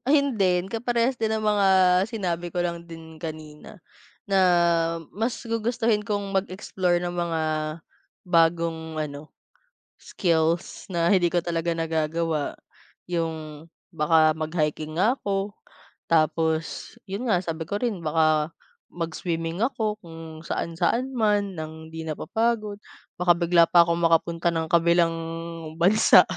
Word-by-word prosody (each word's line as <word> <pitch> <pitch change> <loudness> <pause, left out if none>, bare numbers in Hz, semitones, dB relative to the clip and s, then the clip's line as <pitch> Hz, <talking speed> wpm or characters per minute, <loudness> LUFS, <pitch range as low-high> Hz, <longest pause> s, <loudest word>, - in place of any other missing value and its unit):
Ayun 280 -3 +3
din, 180 -2 +2
kaparehas 235 +3 0
din 220 -1 0
ng 220 0 -1
mga 205 -2 +3 0.4
sinabi 175 -6 -3
ko 175 - -4
lang 170 -1 -3
din 165 -1 -11
kanina. 155 +3 -8 0.5
Na, 195 -1 +2 0.8
mas 225 +4 -2
gugustuhin 230 -1 0
kong 205 -2 -2
mag-explore 185 -2 0
ng 175 0 -3
mga, 170 -2 -1 0.8
bagong 165 -2 +1
ano, 145 0 -8 0.6
skills 165 -1 -1
na 170 0 +2
hindi 180 -3 +4
ko 175 - +2
talaga 170 0 -1
nagagawa. 160 -1 -1 0.6
Yung 160 -3 -4 0.2
baka 155 -1 +3
mag-hiking 155 -1 -2
nga 240 +8 +3
ako, 200 -2 -2 0.6
tapos, 160 0 0 0.2
yun 205 +6 -3
nga, 180 -4 +3
sabi 165 -2 -4
ko 205 +5 -3
rin 225 -8 -1
baka 155 0 +2 0.4
mag-swimming 165 0 -3
ako 220 -5 -2
kung 165 -1 -10
saan-saan 175 +13 -1
man 205 -4 +1
ng 160 0 -7
di 160 0 -7
napapagod. 215 +6 -1 0.4
Baka 180 0 +4
bigla 170 0 +4
pa 170 +1 +6
akong 170 0 +2
makapunta 170 0 +2
ng 160 -1 -2
kabilang 170 0 +3 0.7
bansa. 210 +6 +7
170 Hz, 125 wpm, -25 LUFS, 160-200 Hz, 0.8 s, bansa